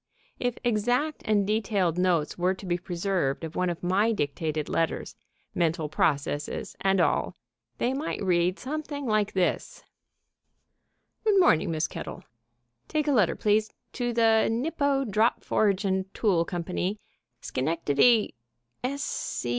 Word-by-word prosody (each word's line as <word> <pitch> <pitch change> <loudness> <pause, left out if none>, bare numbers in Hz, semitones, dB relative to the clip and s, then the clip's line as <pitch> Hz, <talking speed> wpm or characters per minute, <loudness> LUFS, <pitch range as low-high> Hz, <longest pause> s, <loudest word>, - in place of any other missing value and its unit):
If 245 -1 -1
exact 245 +6 0
and 210 -3 +2
detailed 200 -5 0
notes 175 -4 +1
were 180 +2 +1
to 190 - -11
be 175 -1 -1
preserved 175 -5 -1
of 160 0 -6
one 180 0 +1
of 175 0 -5
my 195 +5 +2
dictated 155 -4 -2
letters, 165 -1 -1 0.4
mental 165 -2 0
processes, 145 -1 -1
and 195 0 +2
all, - - +1 0.4
they 250 - 0
might 285 +4 -3
read 180 0 +2
something 290 +1 -5
like 215 -3 +1
this: 185 -2 -1 1.4
"Good 420 -3 +4
morning, 170 - +4
Miss 160 -1 0
Kettle.... - - -7 0.6
Take 305 -1 -1
a - - +3
letter, 210 -9 +3
please... 215 +1 +2 0.2
to 245 -1 -1
the 225 -1 +4
Nipco 275 +3 0
Drop 215 +3 +1
Forge 200 -2 +1
and 190 0 -1
Tool 180 -7 +2
Company, 180 +4 -3 0.4
Schenectady 160 - +2
195 Hz, 130 wpm, -27 LUFS, 170-230 Hz, 1.4 s, Good